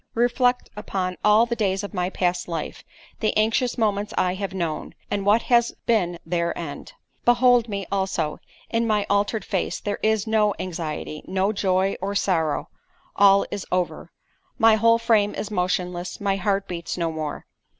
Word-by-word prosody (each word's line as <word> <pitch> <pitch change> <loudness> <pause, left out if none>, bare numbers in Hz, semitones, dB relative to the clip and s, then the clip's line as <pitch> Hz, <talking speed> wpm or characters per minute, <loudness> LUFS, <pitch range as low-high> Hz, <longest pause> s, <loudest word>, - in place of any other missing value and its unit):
Reflect 245 +1 +1
upon 185 -3 -3
all 210 +2 +5
the 235 0 -2
days 195 -3 0
of 205 - -6
my 180 -1 -1
past 180 -2 -1
life—the 175 +6 -5
anxious 225 +4 +1
moments 210 -2 0
I 180 0 +2
have 195 +1 -4
known, 170 -5 -4 0.2
and 200 -1 -1
what 215 +3 +4
has 235 -1 +3
been 180 -7 +1
their 170 0 -1
end. 155 -4 -7 0.3
Behold 245 -1 +4
me, 200 -2 -3
also—in 195 +4 -2
my 210 -2 +1
altered 205 +1 +1
face - - -2
there 205 - -3
is 220 -1 +1
no 215 -2 +2
anxiety—no 180 +2 -3
joy 190 -1 +1
or 200 +1 -2
sorrow—all 195 +3 +1
is 200 - -4
over.——My 225 - -1
whole 230 +1 +4
frame 220 -3 +2
is 215 - -5
motionless—my 180 +1 -1
heart 195 +1 0
beats 170 -1 -5
no 165 -2 -1
more. 155 -2 -5
200 Hz, 145 wpm, -24 LUFS, 180-220 Hz, 0.3 s, all